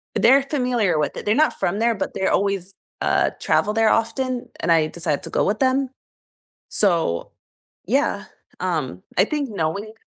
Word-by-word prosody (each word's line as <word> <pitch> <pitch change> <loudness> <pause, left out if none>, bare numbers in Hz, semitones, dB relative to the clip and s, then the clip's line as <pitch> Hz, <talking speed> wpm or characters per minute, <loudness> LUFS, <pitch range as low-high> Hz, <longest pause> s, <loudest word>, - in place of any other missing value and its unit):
They're 265 +4 +5
familiar 250 - 0
with 150 - -1
it - - -6
they're 210 +2 +2
not 310 +2 +3
from 195 +5 0
there, 230 0 +2
but 190 - -3
they're 190 - 0
always 195 -1 -1 0.3
uh, - - +2
travel 210 - +1
there 225 -1 +3
often, 240 +2 0
and 170 - 0
I 160 -2 +4
decided 155 -3 -3
to - - -7
go - - +1
with 210 +2 0
them. 265 0 +2 0.8
So, 170 - +1 0.5
yeah, - - 0 0.3
um, 155 - -2
I 190 - +5
think 290 +1 -2
knowing 200 +3 -3
210 Hz, 165 wpm, -22 LUFS, 175-245 Hz, 0.8 s, They're